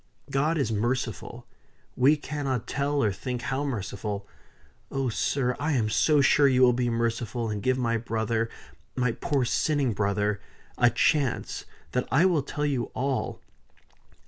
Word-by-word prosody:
God 150 +4 +1
is 130 -7 0
merciful 120 +1 -2 0.5
we 140 +5 +5
cannot 140 -5 -3
tell 145 -1 0
or 105 - +2
think 125 +5 -4
how 135 +1 -1
merciful. 100 -5 -4 0.6
Oh, 135 -2 -1
sir, 125 +2 0
I 150 +3 0
am 110 -5 +1
so 150 +5 +4
sure 140 +1 +5
you 130 -1 +4
will 125 -1 +6
be 120 0 0
merciful, 115 0 -1
and 105 -1 -3
give 130 +4 +1
my 115 -2 +1
brother 115 0 -1 0.5
my 125 -2 +1
poor 135 +2 -1
sinning 140 0 +1
brother 105 0 0 0.3
a 120 - +5
chance, 130 +2 0 0.3
that 125 - -1
I 155 +8 +5
will 175 -6 +3
tell 150 +2 -3
you 135 -5 0
all. 135 0 -2
125 Hz, 150 wpm, -27 LUFS, 115-140 Hz, 0.6 s, will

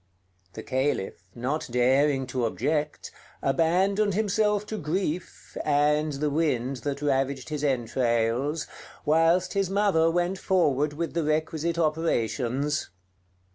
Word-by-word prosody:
The 110 - -7
Caliph, 130 -9 -2
not 140 +6 -2
daring 135 +3 +2
to 125 -1 -2
object, 150 +5 -2 0.3
abandoned 185 +8 +2
himself 210 0 +1
to 215 0 -5
grief, 170 +2 -3
and 150 +1 +2
the 145 +1 -1
wind 135 -4 0
that 140 +3 -4
ravaged 135 -1 0
his 150 -1 -3
entrails, 125 +2 0 0.4
whilst 165 +4 +3
his 195 -2 0
mother 195 -5 +3
went 175 +3 0
forward 150 -6 +1
with 165 +2 -3
the 170 -1 0
requisite 155 +2 -1
operations. 145 -3 0
150 Hz, 115 wpm, -26 LUFS, 135-170 Hz, 0.4 s, whilst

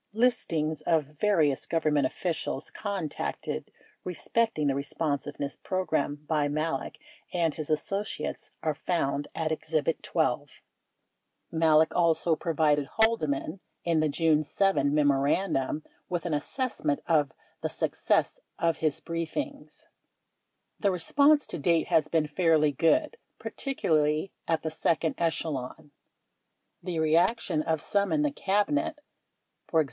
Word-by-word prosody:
Listings 165 - +1
of 160 -3 +2
various 160 -10 +2
Government 150 -4 +2
officials 165 -4 -3
contacted 195 -7 -4 0.3
respecting 180 -1 0
the 140 - +2
Responsiveness 145 0 -3
Program 160 -6 -1
by 150 -2 +1
Malek 150 -1 -2 0.3
and 165 -3 +1
his 155 -1 -6
associates 195 +7 -2
are 155 - +1
found 145 -3 -1
at 160 -1 -1
Exhibit 160 0 -1
12. - - 0
5S - - -20 1.0
Malek 160 -1 +4
also 165 -1 +3
provided 150 -3 +1
Haldeman, 190 -7 +1 0.2
in 165 -2 +2
the 155 -1 +2
June 155 0 +3
7 155 -2 +1
memorandum, 145 +1 +1 0.3
with 175 -1 -2
an 170 - -1
assessment 150 - -1
of 150 -4 +2 0.3
the - - -1
success - - 0 0.2
of 165 -1 +1
his 155 -3 -1
briefings: 180 - -5 0.9
The 200 - +2
response 280 - +3
to - - -6
date 165 +2 +2
has 155 -1 +3
been 160 -1 +1
fairly 155 -1 +3
good, 305 - +2 0.2
particularly 155 - 0 0.2
at 165 -1 0
the 160 - -2
second 160 0 0
echelon. 155 -3 -2 0.9
The 175 -1 -4
reaction 160 +3 +2
of 160 0 0
some 200 -1 0
in 300 -1 +2
the 295 - +1
Cabinet 290 +9 0 0.7
(e.g. 160 - +4
160 Hz, 120 wpm, -28 LUFS, 150-185 Hz, 1.0 s, Malek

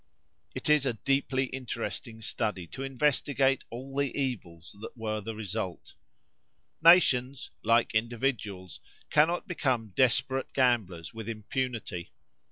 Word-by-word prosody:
It 130 - -3
is 150 -2 +4
a 125 - +1
deeply 135 +2 +1
interesting 120 -2 -5
study 105 -5 -2
to - - -7
investigate 135 0 +1
all 130 +3 -8
the 140 -1 +1
evils 95 -11 -4
that 115 - -8
were 110 -1 -2
the 110 +2 -5
result. 105 -3 -4 0.9
Nations, 140 -6 +5
like 115 0 +3
individuals, 110 -5 -2 0.3
cannot 165 +6 +3
become 130 - 0
desperate 130 +1 +2
gamblers 110 - +1
with 115 0 -6
impunity. 115 -4 -3
120 Hz, 115 wpm, -29 LUFS, 110-135 Hz, 0.9 s, Nations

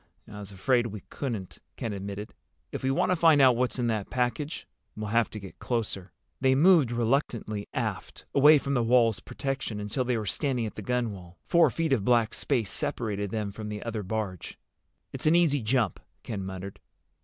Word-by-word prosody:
"I 105 -1 -9
was 100 -1 -8
afraid 120 +5 +1
we 105 -3 -8
couldn't," 110 -10 -5 0.2
Ken 110 - -4
admitted. 100 +1 -6 0.4
"If - - -5
we 130 - 0
want 135 +6 +2
to - - +4
find 165 -3 +5
out 130 -3 +6
what's 125 +2 0
in 125 - 0
that 110 -4 -1
package, 125 +4 -2 0.3
we'll 105 -1 -4
have 115 +1 +2
to 105 - -7
get 95 -2 -11
closer." 105 -6 -3 0.3
They 130 0 +3
moved 155 -4 +5
reluctantly 115 -3 -1
aft, - - -4
away 150 +2 +7
from 140 0 -2
the 125 - +2
wall's 115 -2 +3
protection, 135 -6 -4
until 105 +5 -2
they 125 -1 0
were 110 - -3
standing 125 - -1
at 110 - -5
the - - -7
gunwale. 100 -7 -3
Four 170 -1 +5
feet 165 -4 0
of 115 -7 +1
black 115 -1 +3
space 120 -8 0
separated 110 -9 -2
them 105 -1 -3
from 105 +1 -7
the 105 0 -5
other 115 -2 -3
barge. 100 -3 -4 0.6
"It's - - -2
an 160 - +5
easy 155 -6 +3
jump," 110 -4 +1 0.2
Ken 100 -4 -4
muttered. 95 +1 -7
115 Hz, 190 wpm, -28 LUFS, 105-135 Hz, 0.6 s, away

